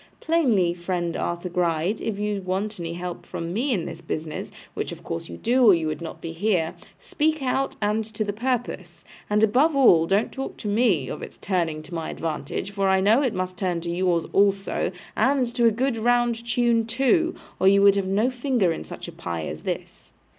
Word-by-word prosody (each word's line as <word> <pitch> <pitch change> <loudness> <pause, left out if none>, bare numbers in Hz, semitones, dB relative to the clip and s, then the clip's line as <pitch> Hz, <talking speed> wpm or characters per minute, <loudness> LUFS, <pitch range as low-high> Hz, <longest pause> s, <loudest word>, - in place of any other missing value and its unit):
Plainly, 240 - +2
friend 175 -1 -2
Arthur 175 +1 -2
Gride, 175 +3 0
if 220 -3 -2
you 210 -1 -2
want 190 +2 -3
any 170 -1 -4
help 175 0 -6
from 165 +1 -5
me 255 +7 0
in 185 -8 0
this 165 - -7
business 160 -1 -5 0.2
(which - - -3
of - - -9
course 85 - -5
you 85 - -7
do, 250 +2 +2
or 210 -6 +8
you 165 -1 -2
would 155 0 -3
not 165 - -7
be 165 - -5
here), 170 -2 0 0.2
speak 310 -1 -1
out, 270 +1 0
and 210 +2 +1
to 215 0 -3
the 205 -1 -3
purpose. 215 -7 -3 0.2
And, 210 +1 +3
above 270 +9 +4
all, 175 -12 +6
don't 200 +5 +1
talk 270 0 -6
to - - -6
me 205 - +2
of - - -6
its - - -9
turning 165 -5 -1
to 165 - -12
my 165 -1 -3
advantage, 160 +4 -4
for 195 -1 0
I 190 0 +4
know 215 +7 +4
it 255 -6 0
must 185 0 -3
turn 180 -3 -1
to 170 0 -3
yours 175 -1 +1
also, 200 0 +2 0.2
and 270 -1 +3
to 240 -1 +2
a - - +5
good 245 +2 0
round 240 0 +1
tune 235 -2 +2
too, 270 +9 +2 0.2
or 190 - +4
you 200 +1 +6
would 200 0 +7
have 195 -1 0
no 210 +7 +2
finger 245 -7 +1
in 160 - -4
such - - -8
a - - -7
pie 85 -2 -5
as 75 0 -6
this. - - -6
200 Hz, 210 wpm, -24 LUFS, 170-235 Hz, 0.2 s, or